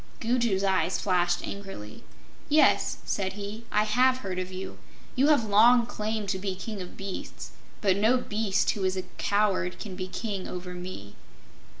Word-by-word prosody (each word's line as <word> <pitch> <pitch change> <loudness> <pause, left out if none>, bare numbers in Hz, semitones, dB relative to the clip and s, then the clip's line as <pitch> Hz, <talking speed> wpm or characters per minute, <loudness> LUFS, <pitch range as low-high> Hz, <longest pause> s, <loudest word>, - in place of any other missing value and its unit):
Gugu's 230 -4 +1
eyes 190 -2 +1
flashed 175 -2 +1
angrily. 195 - -8 0.5
"Yes," 305 +1 +4
said 190 -2 -1
he, 205 +3 -7
"I 210 - +3
have 250 +4 +3
heard 190 -7 -4
of 185 0 -4
you. 185 +1 -7 0.4
You 270 +2 +4
have 290 -7 +4
long 230 +4 +6
claimed 215 -2 -3
to 190 -1 -1
be 190 -1 -3
King 205 +1 -6
of 180 - -9
Beasts, 195 -1 -6 0.3
but 195 -3 +3
no 220 +5 +4
beast 210 -4 0
who 200 - -4
is 185 0 +1
a 185 - -2 0.2
coward 195 -3 +1
can 200 -4 -7
be 185 0 -4
King 200 -1 -4
over 180 0 -6
me." 180 - -8
200 Hz, 170 wpm, -28 LUFS, 185-220 Hz, 0.5 s, long